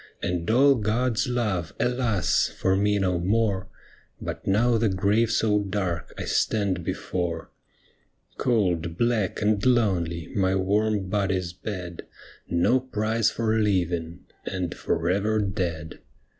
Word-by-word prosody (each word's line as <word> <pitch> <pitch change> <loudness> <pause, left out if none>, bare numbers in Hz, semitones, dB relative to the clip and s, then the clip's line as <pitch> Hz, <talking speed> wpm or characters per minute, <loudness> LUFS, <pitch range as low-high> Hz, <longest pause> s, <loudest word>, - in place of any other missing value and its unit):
And 90 0 -2
all 135 +5 +6
God's 115 +2 0
love, 105 -10 -1
alas! 125 -6 +1
for 95 0 0
me 105 +1 +2
no 90 -3 +1
more, 100 0 0 0.5
But - - -6
now 115 +4 +3
the 115 -1 +2
grave 105 +4 +2
so 110 -2 +2
dark 95 -4 -3
I - - -4
stand 100 -5 0
before. 85 -2 -3 0.9
Cold, 90 -9 0
black, 115 -4 0
and 105 -1 +2
lonely 90 -10 +1
my 95 -1 +2
warm 100 +1 +1
body's 95 -3 -1
bed. 90 -3 -6 0.5
No 100 +10 +3
prize 115 -3 0
for 110 -1 0
living 85 -5 0
— - - -38
and 90 -3 -2
for 80 0 -2
ever 100 +4 +1
dead. 90 -6 -3
100 Hz, 130 wpm, -25 LUFS, 90-110 Hz, 0.9 s, all